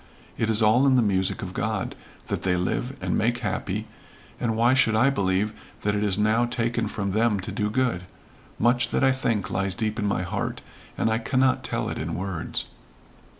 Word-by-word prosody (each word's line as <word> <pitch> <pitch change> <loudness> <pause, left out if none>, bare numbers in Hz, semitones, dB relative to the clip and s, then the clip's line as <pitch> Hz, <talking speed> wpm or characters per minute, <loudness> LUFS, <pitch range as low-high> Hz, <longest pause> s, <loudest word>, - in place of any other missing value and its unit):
It 115 - -1
is 110 0 +3
all 120 +6 +5
in 130 - +5
the 125 - +4
music 95 -3 0
of - - -6
God, - - -2 0.3
that - - -3
they 90 -1 +1
live, 120 +9 -2
and - - -1
make 120 +3 +1
happy, - - -2 0.5
and 115 -2 0
why 120 +2 +4
should 115 -4 +3
I 130 +5 +4
believe 100 -2 0 0.3
that 105 - +1
it 105 0 0
is 100 -2 +2
now 110 +3 +3
taken 120 -1 -1
from 100 -1 -3
them 110 0 +2
to 95 +3 -4
do 105 +1 -1
good? 105 -7 0 0.5
Much 120 +1 +3
that - - 0
I 135 - +5
think 110 -7 -1
lies 100 -1 -1
deep 110 0 -2
in 105 - 0
my 95 -2 0
heart, 90 - -3 0.3
and - - +1
I 110 - +1
cannot 130 +2 +1
tell - - -2
it - - -4
in - - -3
words." 90 -2 -2
110 Hz, 200 wpm, -25 LUFS, 100-120 Hz, 0.5 s, all